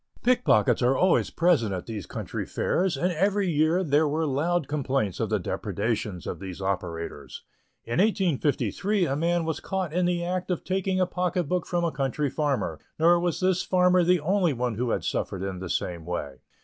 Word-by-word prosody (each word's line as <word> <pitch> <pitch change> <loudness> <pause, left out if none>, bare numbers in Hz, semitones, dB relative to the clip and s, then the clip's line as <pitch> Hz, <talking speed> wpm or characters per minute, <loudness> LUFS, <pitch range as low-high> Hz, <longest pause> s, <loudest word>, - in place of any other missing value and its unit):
Pickpockets 240 - +3
are 125 +2 +3
always 185 0 +3
present 160 - +2
at 90 - -6
these 110 -5 -6
country - - -4
fairs, 185 0 0
and 180 +1 +1
every 195 +4 +1
year 160 +3 +2
there 150 -1 +3
were 155 +2 0
loud 155 +3 0
complaints 135 - -1
of - - -1
the - - +2
depredations 90 -5 -3
of - - -5
these 95 -1 -7
operators. 90 -4 -4 0.4
In 120 +7 -2
1853 190 - +1
a 135 - -1
man 170 +2 +1
was 160 - -2
caught 190 -5 -3
in 180 0 +2
the 175 -1 0
act 180 +1 -2
of 180 - -1
taking 190 0 -1
a 185 - +4
pocket 180 0 -1
book 180 +3 -2
from 175 -1 0
a 170 - +1
country 135 0 -1
farmer, 135 - -1 0.2
nor 170 +2 +5
was 175 -2 -1
this 185 0 +2
farmer 180 -1 +3
the 180 +1 +3
only 180 0 +2
one 125 -1 -1
who 120 +3 -2
had - - -1
suffered 95 -1 -2
in 95 -2 -4
the 95 -1 -6
same 85 -1 -2
way. 75 -5 -4
160 Hz, 190 wpm, -26 LUFS, 120-180 Hz, 0.4 s, nor